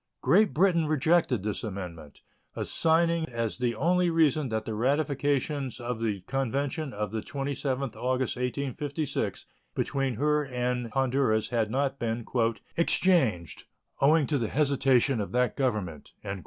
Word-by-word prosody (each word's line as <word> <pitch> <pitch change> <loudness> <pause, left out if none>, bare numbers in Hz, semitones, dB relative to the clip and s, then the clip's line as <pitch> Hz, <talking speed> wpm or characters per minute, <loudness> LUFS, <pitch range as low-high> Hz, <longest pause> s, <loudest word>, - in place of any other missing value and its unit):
Great 215 0 +4
Britain 170 -2 +3
rejected 155 - +2
this 105 -1 -3
amendment, 90 -8 -7 0.3
assigning 165 0 +1
as 115 -1 -3
the 120 -2 0
only 175 +7 +2
reason 155 -4 +2
that 110 -1 -2
the 110 - -3
ratifications 140 +2 0
of 120 -1 -4
the 105 -4 -1
convention 135 - -2
of 105 -4 -4
the 110 -1 -2
27th 135 -1 -3
August, 130 0 -1
1856, 140 +3 -3 0.3
between 135 -3 -1
her 150 +4 +2
and 125 -2 -2
Honduras 130 -4 +1
had 115 -3 0
not 135 +3 -1
been 115 0 -2 0.5
"exchanged, 125 - +1 0.3
owing 150 +2 +4
to 145 0 0
the 115 - -1
hesitation 135 -3 +2
of 100 - -5
that 125 0 +1
Government." 105 - -2
135 Hz, 130 wpm, -28 LUFS, 115-150 Hz, 0.5 s, Great